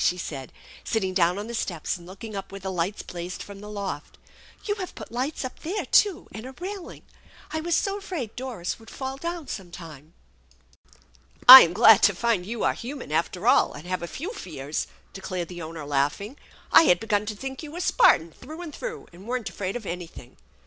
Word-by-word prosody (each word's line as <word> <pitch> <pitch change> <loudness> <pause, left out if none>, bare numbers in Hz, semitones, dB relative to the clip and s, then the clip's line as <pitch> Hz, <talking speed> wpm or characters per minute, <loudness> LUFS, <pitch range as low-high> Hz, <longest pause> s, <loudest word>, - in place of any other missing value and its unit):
she 180 - +2
said, 135 -6 -6 0.3
sitting 190 -4 -1
down 180 0 +3
on 205 - -4
the 235 - -7
steps 175 -8 -2
and 175 -1 -12
looking 200 +3 -9
up 195 -1 -6
where 195 - -7
the 190 0 -4
lights 180 +3 -2
blazed 175 +1 -6
from 200 -1 -11
the 210 - -9
loft. 195 -8 -5 0.2
" - - -24
You 410 - +2
have 370 - -6
put - - -9
lights 260 +4 -2
up 255 - -7
there, 375 +6 -3
too, 395 -5 +3
and 220 - -8
a 265 - -9
railing. 375 +4 -7 0.5
I 315 - -2
was 340 +1 0
so 395 +3 0
afraid 330 - -5
Doris 245 -9 -4
would 225 - -14
fall 265 0 -5
down 335 0 -5
some 190 -4 -6
time! 160 -3 -11 0.4
" - - -30
" - - -31 0.3
I'm 255 -9 +13
glad 220 +3 +7
to 205 - +5
find 220 -4 0
you 230 0 -3
are - - +3
human, 255 - -7
after 175 +6 -1
all, - - +5
and 150 - -10
have 185 0 -2
a 170 - -4
few 345 - -6
fears! 150 - -5
" - - -34
declared 185 -2 -5
the 175 -1 -7
owner, 160 -1 -7
laughing. 145 - 0
<f 285 - -19 0.3
I - - +9
had 175 - +5
begun 210 -2 0
to 215 - -3
think 265 +4 -6
you 305 -2 -8
were 340 - -6
Spartan 170 - +4
through 315 - -10
and 315 -4 -8
through 485 +3 -6
and 185 +5 -13
weren't 245 -3 -3
afraid 190 +1 -4
of 240 -4 -5
anything. 170 -8 -8
205 Hz, 220 wpm, -25 LUFS, 175-265 Hz, 0.5 s, I'm